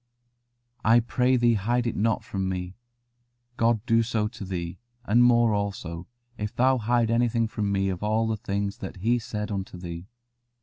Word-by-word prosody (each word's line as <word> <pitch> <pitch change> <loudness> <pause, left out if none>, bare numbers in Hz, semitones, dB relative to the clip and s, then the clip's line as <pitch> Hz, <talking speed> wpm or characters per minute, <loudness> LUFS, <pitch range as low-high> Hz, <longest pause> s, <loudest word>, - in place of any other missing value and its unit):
"I 115 +2 +6
pray 125 +2 +1
thee 120 -1 +4
hide 120 +4 0
it 115 - -1
not 110 +1 +1
from 95 -1 -3
me: 90 0 -4 0.8
God 115 -2 +1
do 115 -2 +4
so 110 -2 0
to 120 -2 -9
thee, 90 -2 -5 0.3
and 120 +3 +4
more 120 -2 +5
also, 95 -5 -3 0.3
if 105 0 -4
thou 130 +1 +3
hide 115 0 +1
anything 115 -1 +2
from 105 -2 -2
me 95 0 +1
of 95 -1 -4
all 110 +2 +1
the 110 0 0
things 100 0 -3
that 95 - -6
He 115 +6 +1
said 110 -3 -5
unto 95 -2 -4
thee." 85 0 -7
110 Hz, 175 wpm, -26 LUFS, 95-120 Hz, 0.8 s, I